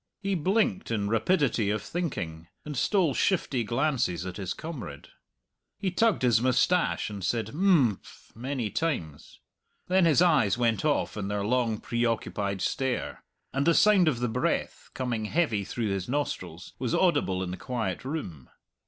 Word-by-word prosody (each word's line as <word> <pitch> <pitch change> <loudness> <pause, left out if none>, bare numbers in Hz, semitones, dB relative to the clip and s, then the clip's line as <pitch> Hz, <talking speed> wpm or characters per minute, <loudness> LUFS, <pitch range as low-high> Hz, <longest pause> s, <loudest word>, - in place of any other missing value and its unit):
He 195 -1 -2
blinked 195 +4 +1
in 105 -3 -1
rapidity 115 - +2
of 105 0 -1
thinking, 85 - -4 0.2
and 150 -1 -5
stole 170 - +2
shifty 135 -7 +1
glances 120 - 0
at 90 -1 -6
his 95 -3 -4
comrade. 125 - -7 0.7
He 195 -2 -2
tugged 220 - +2
his 120 -3 +4
moustache 130 +2 +2
and 100 -2 -6
said 115 +5 -1
"Imphm" 155 - +3 0.4
many 125 -2 -3
times. 85 - -3 0.5
Then 185 -1 +4
his 160 -3 +4
eyes 135 - +4
went 115 0 +1
off 150 -7 0
in 100 -2 -3
their 100 0 -2
long 115 -2 +1
preoccupied 110 -5 -1
stare, 130 +2 -2 0.3
and 140 +3 0
the 170 - +5
sound 205 -5 +5
of 125 -6 +1
the 125 - +1
breath, 110 - -2
coming 120 -4 -2
heavy 115 -6 +1
through 105 +2 -3
his 95 0 -3
nostrils, 95 - -3
was 125 -2 -1
audible 95 - +2
in 90 - -4
the - - -3
quiet 115 -8 -3
room. 130 - -6
120 Hz, 155 wpm, -28 LUFS, 100-160 Hz, 0.7 s, the